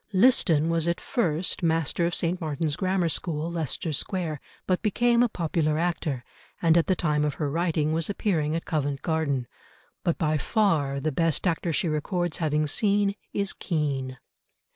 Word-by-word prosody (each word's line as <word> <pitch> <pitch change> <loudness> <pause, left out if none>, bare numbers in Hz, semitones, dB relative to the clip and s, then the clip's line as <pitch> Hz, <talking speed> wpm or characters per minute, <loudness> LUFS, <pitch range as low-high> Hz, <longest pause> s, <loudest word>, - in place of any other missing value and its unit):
Liston 175 - +4
was 165 0 +1
at 170 - 0
first 175 - -1
master 165 0 +1
of 175 - -2
St. 175 +1 0
Martin's 155 -1 -1
Grammar 185 -1 +1
School, 160 0 -2
Leicester 160 -1 -2
Square, 160 -1 -2 0.2
but 185 -1 +1
became 235 +2 +3
a 245 - +3
popular 160 -4 0
actor, 160 -6 -1 0.4
and 165 -1 +4
at 170 - +3
the 185 - +3
time 150 -4 +1
of 150 -2 -1
her 145 -3 -2
writing 160 -2 0
was 165 +2 0
appearing 165 -7 0
at 165 - -3
Covent 145 -4 -2
Garden. 155 -6 0 0.6
But 170 - +1
by 155 -1 +1
far 155 -10 +1
the 155 +3 -1
best 165 +4 0
actor 170 -1 0
she 175 +3 0
records 175 +2 -1
having 155 -2 +1
seen 200 +5 +2 0.2
is 200 -1 0
Kean. 140 -6 -2
165 Hz, 165 wpm, -26 LUFS, 150-180 Hz, 0.6 s, Liston